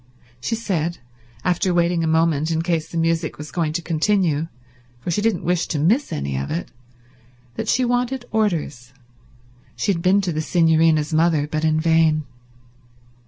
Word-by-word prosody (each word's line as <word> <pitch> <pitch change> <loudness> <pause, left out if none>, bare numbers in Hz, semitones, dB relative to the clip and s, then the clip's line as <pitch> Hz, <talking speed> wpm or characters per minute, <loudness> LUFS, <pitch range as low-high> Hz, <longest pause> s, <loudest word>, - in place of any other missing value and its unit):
She 135 - -2
said, 175 -7 -2 0.5
after 180 0 +1
waiting 170 -1 +2
a - - 0
moment 160 -1 +2
in 165 0 0
case 165 -2 -1
the 170 - -5
music 165 -1 0
was 150 +1 -8
going 165 -3 -1
to 170 +1 -3
continue, 165 -1 +1 0.5
for 170 - -4
she 190 - 0
didn't 215 -5 0
wish 175 -1 0
to 155 - -2
miss 210 - +2
any 70 -1 -3
of 70 +1 -3
it, 170 - -4 0.8
that - - -5
she 255 - +2
wanted 245 +1 -1
orders; 155 - -1 0.8
she 200 - 0
had 170 - -4
been 185 +3 +4
to 185 -3 -2
the 155 - -1
Signorina's 160 -2 +2
mother, 160 -2 +3
but 155 +1 -3
in 155 0 +2
vain. 160 -1 +3
165 Hz, 165 wpm, -21 LUFS, 155-180 Hz, 0.8 s, been